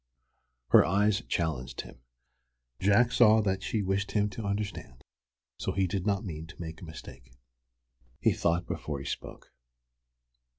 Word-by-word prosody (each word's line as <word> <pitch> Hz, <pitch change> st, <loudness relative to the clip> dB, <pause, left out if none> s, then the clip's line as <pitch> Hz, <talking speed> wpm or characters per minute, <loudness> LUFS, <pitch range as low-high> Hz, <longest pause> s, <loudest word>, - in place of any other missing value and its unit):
Her -, -, +8 dB
eyes 100 Hz, +3 st, +2 dB
challenged 65 Hz, -7 st, -2 dB
him. -, -, -13 dB, 0.8 s
Jack 105 Hz, +5 st, +4 dB
saw 110 Hz, -3 st, +6 dB
that 95 Hz, -2 st, 0 dB
she 105 Hz, +1 st, -1 dB
wished 95 Hz, +1 st, -1 dB
him 105 Hz, -1 st, +1 dB
to 110 Hz, +3 st, -6 dB
understand, 100 Hz, -4 st, -3 dB
and 65 Hz, -, -23 dB, 0.6 s
so -, -, -2 dB
he 95 Hz, 0 st, +2 dB
did 95 Hz, +2 st, -2 dB
not 100 Hz, +1 st, 0 dB
mean 80 Hz, -3 st, -6 dB
to 85 Hz, -, -14 dB
make 80 Hz, -1 st, -7 dB
a -, -, -7 dB
mistake. 80 Hz, -5 st, -11 dB, 0.9 s
He -, -, +3 dB
thought 85 Hz, +1 st, 0 dB
before 75 Hz, -2 st, -4 dB
he 70 Hz, -, -7 dB
spoke. -, -, -7 dB
95 Hz, 155 wpm, -29 LUFS, 80-100 Hz, 0.9 s, Her